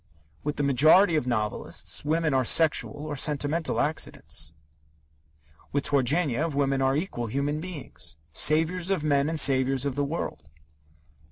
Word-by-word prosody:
With 150 Hz, 0 st, -3 dB
the 145 Hz, -, -2 dB
majority 155 Hz, +7 st, +4 dB
of 150 Hz, -5 st, -1 dB
novelists, 110 Hz, -4 st, -2 dB
women 155 Hz, 0 st, 0 dB
are 130 Hz, -1 st, +2 dB
sexual 150 Hz, +1 st, +2 dB
or 150 Hz, -1 st, -5 dB
sentimental 150 Hz, +3 st, 0 dB
accidents. 145 Hz, -, -2 dB, 1.2 s
With 140 Hz, 0 st, -1 dB
Turgenev, 145 Hz, +2 st, 0 dB
women 135 Hz, -1 st, 0 dB
are 135 Hz, 0 st, +1 dB
equal 145 Hz, -7 st, -3 dB
human 140 Hz, +6 st, -2 dB
beings 140 Hz, -, -9 dB, 0.2 s
saviours 165 Hz, +4 st, +2 dB
of 190 Hz, -6 st, -1 dB
men 145 Hz, -1 st, +1 dB
and 160 Hz, -1 st, 0 dB
saviours 135 Hz, -1 st, +3 dB
of 140 Hz, -, -1 dB
the 145 Hz, +2 st, -1 dB
world. 80 Hz, -, -5 dB
145 Hz, 140 wpm, -26 LUFS, 135-155 Hz, 1.2 s, majority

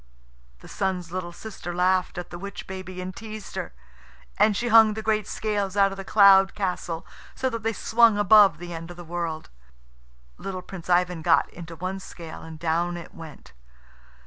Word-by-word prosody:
The -, -, -13 dB
Sun's 180 Hz, -3 st, -3 dB
little 180 Hz, -1 st, -4 dB
sister 175 Hz, -2 st, -8 dB
laughed 180 Hz, 0 st, +1 dB
at 175 Hz, -, -6 dB
the 175 Hz, -, -7 dB
witch 200 Hz, +2 st, -7 dB
baby 185 Hz, -1 st, -7 dB
and 185 Hz, 0 st, -6 dB
teased 215 Hz, +2 st, -8 dB
her, -, -, -4 dB, 0.7 s
and 210 Hz, -2 st, +4 dB
she 240 Hz, +2 st, -1 dB
hung 220 Hz, -1 st, +7 dB
the 220 Hz, -, -5 dB
great 215 Hz, -1 st, 0 dB
scales 205 Hz, -2 st, -2 dB
out 195 Hz, -1 st, +4 dB
of 195 Hz, -, -7 dB
the 195 Hz, -, -6 dB
cloud 195 Hz, -1 st, +6 dB
castle 180 Hz, -4 st, -3 dB, 0.3 s
so 260 Hz, 0 st, -1 dB
that 230 Hz, -1 st, -4 dB
they 225 Hz, +1 st, -1 dB
swung 225 Hz, -1 st, +4 dB
above 205 Hz, -4 st, +6 dB
the 175 Hz, +1 st, -8 dB
end 165 Hz, 0 st, -7 dB
of 175 Hz, -, -10 dB
the 175 Hz, -, -8 dB
world. 165 Hz, -, -4 dB, 0.9 s
Little 185 Hz, -2 st, -5 dB
Prince 180 Hz, -2 st, -10 dB
Ivan 175 Hz, -1 st, +2 dB
got 165 Hz, 0 st, +3 dB
into 165 Hz, -1 st, -9 dB
one 185 Hz, +3 st, -4 dB
scale, 170 Hz, -3 st, -10 dB
and 160 Hz, -1 st, -9 dB
down 170 Hz, +2 st, -1 dB
it 170 Hz, -, -10 dB
went. 160 Hz, -, -12 dB
185 Hz, 185 wpm, -25 LUFS, 175-205 Hz, 0.9 s, hung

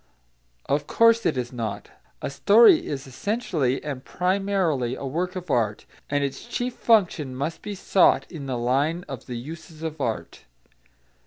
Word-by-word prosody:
Of 145 Hz, +1 st, 0 dB
course 230 Hz, 0 st, +4 dB
it -, -, 0 dB
is 125 Hz, 0 st, -3 dB
not. 115 Hz, -3 st, -5 dB, 0.3 s
A -, -, -2 dB
story 225 Hz, -, +6 dB
is 140 Hz, -1 st, -4 dB
essentially 145 Hz, -, -1 dB
and 140 Hz, -3 st, -5 dB
primarily 180 Hz, -10 st, 0 dB
a 140 Hz, -, -6 dB
work 175 Hz, +7 st, -2 dB
of 180 Hz, -4 st, -5 dB
art, 110 Hz, -4 st, 0 dB, 0.2 s
and 145 Hz, 0 st, +1 dB
its 135 Hz, -1 st, -3 dB
chief 245 Hz, 0 st, -2 dB
function 170 Hz, -, +2 dB
must 140 Hz, +5 st, -3 dB
be 205 Hz, -1 st, -5 dB
sought 190 Hz, 0 st, +3 dB
in 150 Hz, -6 st, -7 dB
the 130 Hz, -2 st, -2 dB
line 140 Hz, +8 st, 0 dB
of 135 Hz, -4 st, -8 dB
the 125 Hz, -, -4 dB
uses 155 Hz, +5 st, -9 dB
of 160 Hz, -2 st, -4 dB
art. 115 Hz, -4 st, -4 dB
150 Hz, 160 wpm, -25 LUFS, 130-185 Hz, 0.3 s, story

